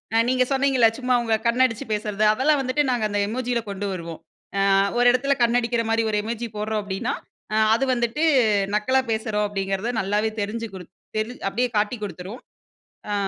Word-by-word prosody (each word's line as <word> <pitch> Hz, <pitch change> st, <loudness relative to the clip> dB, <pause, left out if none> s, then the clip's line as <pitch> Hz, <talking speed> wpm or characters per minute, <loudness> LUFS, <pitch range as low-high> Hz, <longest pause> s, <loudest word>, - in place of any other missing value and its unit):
அ -, -, +5 dB
நீங்க 255 Hz, 0 st, +3 dB
சொன்னீங்கல்ல, 265 Hz, -3 st, +4 dB
சும்மா 250 Hz, 0 st, 0 dB
உங்க 225 Hz, -1 st, +2 dB
கண்ண 245 Hz, +2 st, +4 dB
அடிச்சு 245 Hz, +3 st, -7 dB
பேசுறது. 210 Hz, 0 st, -2 dB
அதெல்லாம் 280 Hz, +5 st, +2 dB
வந்துட்டு 265 Hz, +3 st, +1 dB
நாங்க 240 Hz, -3 st, 0 dB
அந்த 205 Hz, -, -1 dB
எமோஜியில 245 Hz, +1 st, -1 dB
கொண்டு 200 Hz, 0 st, -4 dB
வருவோம். 170 Hz, -3 st, -7 dB, 0.4 s
"அ -, -, +3 dB, 0.4 s
ஒரு 245 Hz, -, +4 dB
இடத்துல 275 Hz, +3 st, +1 dB
கண்ணடிக்கிற 235 Hz, 0 st, +1 dB
மாரி 225 Hz, 0 st, +2 dB
ஒரு 210 Hz, -, +1 dB
எமோஜி 235 Hz, +2 st, -4 dB
போடுறோம்." 215 Hz, 0 st, -1 dB
அப்படீன்னா 195 Hz, -1 st, -3 dB, 0.4 s
அ -, -, +1 dB, 0.2 s
அது 270 Hz, +4 st, 0 dB
வந்துட்டு, 240 Hz, +4 st, -1 dB, 0.5 s
"நக்கலா 260 Hz, +5 st, +2 dB
பேசுறோம்." 220 Hz, -1 st, -1 dB
அப்படீங்கிறத 195 Hz, +3 st, -2 dB
நல்லாவே 210 Hz, +3 st, 0 dB
தெரிஞ்சு 225 Hz, +3 st, -3 dB
குடு 185 Hz, -2 st, -8 dB, 0.3 s
தெரிஞ் 225 Hz, +3 st, -3 dB
அப்படியே 245 Hz, +6 st, 0 dB
காட்டிக் 215 Hz, +1 st, -1 dB
குடுத்துரும். 200 Hz, +3 st, -7 dB, 0.7 s
அ, -, -, 0 dB
225 Hz, 170 wpm, -23 LUFS, 210-250 Hz, 0.7 s, அ